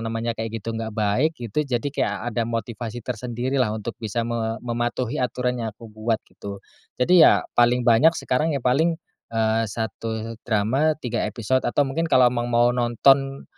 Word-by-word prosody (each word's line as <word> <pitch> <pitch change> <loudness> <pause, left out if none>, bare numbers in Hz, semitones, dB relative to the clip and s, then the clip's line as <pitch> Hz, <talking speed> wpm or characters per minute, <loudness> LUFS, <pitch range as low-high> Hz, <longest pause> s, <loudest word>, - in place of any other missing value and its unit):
namanya 115 +1 -2
kayak 110 0 -4 0.2
gitu 115 - -3
nggak 110 -1 -5
baik, 115 +10 +1
gitu, 120 +2 -2
jadi 125 +1 -1
kayak 105 - 0 0.2
ada 115 +1 -1
motivasi 115 0 -5
tersendiri 125 +2 -2
lah 125 - +3
untuk 110 +2 -5
bisa 115 +1 -2
me 115 -1 -2
mematuhi 120 +2 -2
aturan 125 0 -1
yang 115 - -2
aku 115 - -13
buat, 110 +1 0
gitu. 100 -1 -9 0.4
Jadi 175 +8 +5
ya, 160 - +6
paling 120 +1 +3
banyak 135 +9 +5
sekarang 150 +4 0
ya 135 - -6
paling, 160 +7 +2 0.3
eee, 110 0 +1
satu 110 +1 -5
drama 125 +9 +2
3 125 -7 -3
episode 120 +4 0
atau 145 - +2
mungkin 165 +5 -2
kalau 125 -4 +5
emang 120 -1 -2
mau 120 0 +3
nonton, 135 +3 +2
120 Hz, 170 wpm, -23 LUFS, 115-130 Hz, 0.4 s, ya